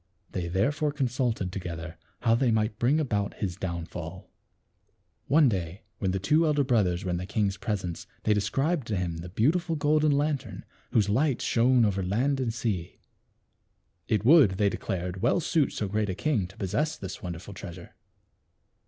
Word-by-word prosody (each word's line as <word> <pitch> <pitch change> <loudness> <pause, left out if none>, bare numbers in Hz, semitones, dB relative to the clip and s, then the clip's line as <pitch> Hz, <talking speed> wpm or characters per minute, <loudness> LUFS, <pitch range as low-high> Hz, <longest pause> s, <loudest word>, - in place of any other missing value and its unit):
They 90 -2 -3
therefore 145 - +1
consulted 125 -8 -1
together 85 -3 -6 0.3
how 115 -2 +3
they 120 +2 +3
might 110 -1 0
bring 135 +6 +3
about 105 -9 -1
his 95 -4 -3
down 85 -3 -4
fall. 85 +2 -8 1.0
One 150 0 +5
day 95 -3 -2 0.2
when 95 - 0
the 95 - 0
two 150 - +3
elder 150 -2 +2
brothers 100 -8 +1
were 90 - -1
in 85 - 0
the 90 +1 -5
king's 100 -1 0
presence 95 -6 -4 0.2
they 110 - +3
described 135 - 0
to 105 - -1
him 90 -3 -2
the 85 +2 -7
beautiful 160 - +1
golden 150 0 +3
lantern, 140 -4 -1 0.2
whose 105 -3 +2
light 130 +5 +2
shone 120 0 +3
over 100 -2 0
land 125 +10 0
and 125 -3 0
sea. 110 -7 -3 1.1
It 105 -1 0
would, 135 - +7
they 100 0 +3
declared, 90 -2 -4
well 120 +9 +3
suit 160 -3 +1
so 105 - -3
great 105 +1 -1
a 95 - -2
king 120 -10 0
to 95 +4 -17
possess 110 - -1
this 95 -1 -7
wonderful 90 +2 -6
treasure. 90 -2 -9
105 Hz, 170 wpm, -28 LUFS, 95-135 Hz, 1.1 s, would